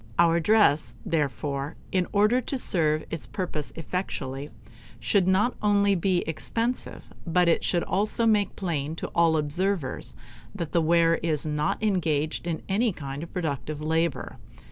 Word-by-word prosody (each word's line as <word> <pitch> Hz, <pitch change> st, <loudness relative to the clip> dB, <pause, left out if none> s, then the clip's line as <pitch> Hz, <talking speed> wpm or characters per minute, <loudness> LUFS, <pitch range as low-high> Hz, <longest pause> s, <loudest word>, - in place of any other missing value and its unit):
Our 170 Hz, 0 st, +4 dB
dress, 170 Hz, -5 st, +3 dB
therefore, 145 Hz, -2 st, -2 dB, 0.2 s
in 185 Hz, -2 st, +1 dB
order 215 Hz, +5 st, +3 dB
to 270 Hz, -, -3 dB
serve 155 Hz, -9 st, +1 dB
its 150 Hz, -8 st, -4 dB
purpose 150 Hz, +1 st, -4 dB
effectually, 150 Hz, -5 st, -4 dB, 0.5 s
should 180 Hz, -, +2 dB
not 200 Hz, +6 st, +3 dB
only 205 Hz, -1 st, +3 dB
he 185 Hz, -1 st, +2 dB
expensive, 230 Hz, +9 st, -2 dB, 0.2 s
but 175 Hz, +1 st, +3 dB
it 170 Hz, -, +3 dB
should 175 Hz, -2 st, +1 dB
also 215 Hz, +4 st, +1 dB
make 210 Hz, -3 st, +2 dB
plain 160 Hz, -5 st, -2 dB
to -, -, -5 dB
all 165 Hz, -1 st, +3 dB
observers 155 Hz, 0 st, -2 dB, 0.4 s
that 170 Hz, -5 st, -4 dB
the 170 Hz, -, +3 dB
wearer 165 Hz, 0 st, +3 dB
is 155 Hz, -3 st, -1 dB
not 150 Hz, +6 st, -1 dB
engaged 165 Hz, -6 st, 0 dB
in 165 Hz, -2 st, -3 dB
any 220 Hz, +4 st, +2 dB
kind 140 Hz, -4 st, -6 dB
of 165 Hz, -, -8 dB
productive 155 Hz, -3 st, -3 dB
labor. 160 Hz, -2 st, -1 dB
170 Hz, 145 wpm, -26 LUFS, 150-195 Hz, 0.5 s, Our